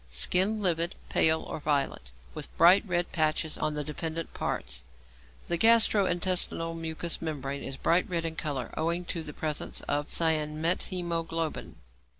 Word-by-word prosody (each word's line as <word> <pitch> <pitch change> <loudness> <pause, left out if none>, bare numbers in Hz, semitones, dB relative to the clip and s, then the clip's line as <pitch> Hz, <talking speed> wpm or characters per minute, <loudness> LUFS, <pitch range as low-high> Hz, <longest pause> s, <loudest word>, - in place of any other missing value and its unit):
_ - - -28
Skin 190 - +2
livid, 170 -1 +1
pale, 160 0 +3
or - - -6
violet, 140 - -1 0.2
with 155 -2 -8
bright 180 +4 +7
red 175 -1 0
patches 155 -1 +1
on 150 - -1
the 150 - -2
dependent 160 +2 -5
parts. - - -3 0.7
The 170 - 0
gastro 225 -1 +5
intestinal 175 -2 0
mucous 165 0 -2
membrane 140 -3 -4
is 135 - -5
bright 170 +5 +2
red 170 -2 -1
in 160 -1 -3
colour, 145 -5 -4
owing 170 +3 -1
to 170 - -3
the 150 - -6
presence 155 0 -3
of 145 0 -2
cyanmethæmoglobin. 165 +1 0
165 Hz, 150 wpm, -29 LUFS, 150-175 Hz, 0.7 s, bright